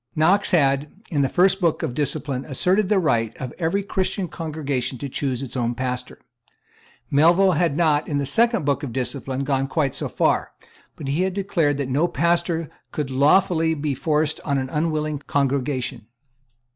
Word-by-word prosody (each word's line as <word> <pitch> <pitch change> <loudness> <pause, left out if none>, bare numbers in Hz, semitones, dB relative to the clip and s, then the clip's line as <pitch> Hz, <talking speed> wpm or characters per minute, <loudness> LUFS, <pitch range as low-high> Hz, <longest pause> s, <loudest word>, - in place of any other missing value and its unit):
Knox 185 +6 +3
had, 140 -4 +2 0.2
in 145 -4 +1
the 135 - +2
First 190 +2 +3
Book 170 -2 +1
of 145 -6 -2
Discipline, 140 -1 -2
asserted 185 +8 +1
the 210 - +3
right 115 - +1
of 130 -2 -6
every 185 +4 0
Christian 190 -1 -2
congregation 145 -6 -3
to 140 - -5
choose 135 -1 -2
its 135 - -6
own 120 -1 -1
pastor. 125 0 -4 0.9
Melville 170 +7 +5
had 165 -3 +1
not, 155 -3 +2
in 145 - -1
the 140 - 0
Second 230 - +2
Book 140 -1 +1
of 135 -6 -5
Discipline, 130 +1 -3
gone 135 -1 0
quite 140 -3 0
so - - -3
far; - - 0 0.4
but 140 - -7
he 145 +6 0
had 190 0 0
declared 170 -8 0
that 140 -2 -2
no 145 +6 +1
pastor 170 0 0 0.2
could 145 -3 -3
lawfully 160 +4 +3
be 145 -1 -2
forced 150 +3 0
on 140 -2 0
an 130 -1 -3
unwilling 155 -1 -1
congregation. 135 -4 -1
145 Hz, 170 wpm, -23 LUFS, 135-170 Hz, 0.9 s, Melville